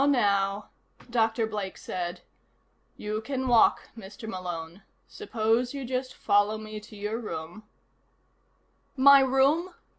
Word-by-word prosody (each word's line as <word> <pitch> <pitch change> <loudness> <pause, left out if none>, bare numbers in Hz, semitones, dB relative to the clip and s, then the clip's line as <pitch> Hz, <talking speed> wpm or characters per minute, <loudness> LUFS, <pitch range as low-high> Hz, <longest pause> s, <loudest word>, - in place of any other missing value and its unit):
"Now, 280 - +4
now," 200 -5 +1 0.4
Dr. 225 -1 +2
Blake 210 -3 -5
said. 175 -1 -5 0.8
"You 215 +1 -3
can 260 +2 -3
walk, 240 -2 +4
Mr. 210 0 -10
Malone. 175 -3 -6 0.3
Suppose 245 - -1
you 275 -2 -4
just 255 +1 -3
follow 205 +1 +2
me 215 0 -7
to 210 +1 -14
your 210 +2 -3
room 175 -3 -6 0.7
" - - -42
"My 280 +1 +8
room?" 275 +7 +2
220 Hz, 125 wpm, -27 LUFS, 200-255 Hz, 0.8 s, My